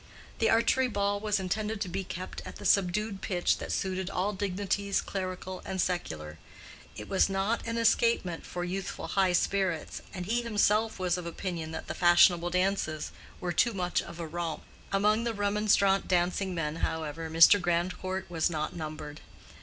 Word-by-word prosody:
The 225 - +3
archery 245 +3 +3
ball 200 -2 0
was 210 -1 0
intended 210 +3 -2
to 195 - -1
be 190 +2 -3
kept 185 0 -6
at - - -9
the - - -9
subdued 200 +1 +2
pitch 175 -3 +1
that - - -5
suited 190 -1 -2
all 195 +2 -1
dignities 200 0 -1
clerical 185 -1 -5
and 190 -1 -4
secular; 80 - -2 0.6
it 105 - -8
was 195 - +3
not 195 +5 -1
an 230 0 -2
escapement 230 -6 +2
for 175 - -5
youthful 185 +2 -4
high 190 -2 +2
spirits, 185 -2 0
and 180 -2 -5
he 235 +5 +1
himself 220 -1 +2
was 180 -1 0
of 175 - -6
opinion 170 -2 -4
that - - -5
the - - -3
fashionable 175 0 +5
dances 180 -4 0 0.3
were 175 -1 -2
too 230 +6 +2
much 180 -2 0
of 170 0 -10
a 170 - -3
romp. 165 0 -4 0.3
Among 210 +3 +2
the 235 -1 -2
remonstrant 205 -1 +2
dancing 180 +1 +1
men, 155 -1 -2
however, 160 0 -3
Mr. 165 +5 +7
Grandcourt 180 +2 -1
was 165 -1 0
not 155 -2 -3
numbered. 155 -2 -6
185 Hz, 170 wpm, -29 LUFS, 175-200 Hz, 0.6 s, Mr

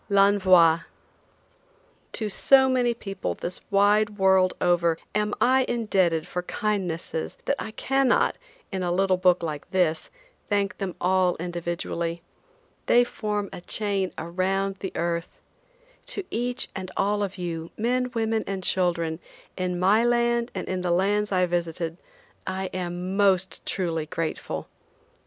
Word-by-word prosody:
L'ENVOI. 190 -5 +5 1.3
To 220 - -1
so 265 +6 +5
many 250 -2 +2
people 195 - -4
this 180 +1 -5
wide 205 +1 +3
world 190 -1 +4
over 170 -2 +2 0.2
am 210 0 0
I 260 +1 +4
indebted 190 -9 +1
for 180 - -3
kindnesses 180 -5 -3
that - - +1
I - - -4
cannot, 270 +3 +1 0.3
in 190 - -2
a 175 -1 0
little 190 +1 +2
book 180 -1 +3
like 150 -3 -5
this, 170 -4 +1 0.4
thank 200 -1 0
them 195 -3 -3
all 185 0 +2
individually. 170 -1 -3 0.6
They 245 - +6
form 210 -4 -3
a - - -7
chain 195 -1 -1
around 190 +3 -1
the 190 - -4
earth. 170 0 -2 0.7
To - - -2
each 245 +2 -1
and 185 -1 -5
all 205 +1 +1
of 200 -1 -3
you, 170 -2 -4
men, 250 +3 0
women 225 -1 0
and 195 -1 -3
children, 170 -3 0 0.4
in 180 -1 -2
my 200 +5 +4
land 235 0 +2
and 185 - -4
in 185 -1 -2
the 180 - -1
lands 205 +4 +1
I 185 -1 +3
visited, 170 -1 -2 0.5
I 190 0 -3
am 180 +1 -3
most 190 -2 +2
truly 165 -4 -2
grateful. 165 -1 -4
190 Hz, 140 wpm, -25 LUFS, 175-210 Hz, 1.3 s, They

